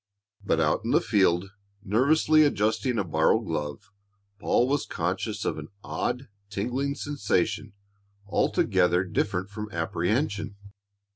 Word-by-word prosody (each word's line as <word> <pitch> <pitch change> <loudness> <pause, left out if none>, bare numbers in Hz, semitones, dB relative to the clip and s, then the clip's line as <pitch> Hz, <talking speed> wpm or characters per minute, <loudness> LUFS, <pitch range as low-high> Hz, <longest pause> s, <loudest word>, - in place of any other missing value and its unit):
But - - +1
out - - +1
in - - -3
the - - +5
field, 95 -3 +2 0.3
nervously 150 +8 +4
adjusting 110 -2 +1
a 100 - +1
borrowed 80 +6 +2
glove, 80 +4 -4 0.5
Paul 120 +3 +2
was 140 +1 0
conscious 95 +5 -2
of - - -1
an 75 - -8 0.2
odd, 130 +2 -3 0.2
tingling 125 +8 -2
sensation 105 -7 -1 0.5
altogether 90 -2 +2
different 90 +1 -2
from 105 0 -6
apprehension. 100 - -1
105 Hz, 120 wpm, -27 LUFS, 90-125 Hz, 0.5 s, the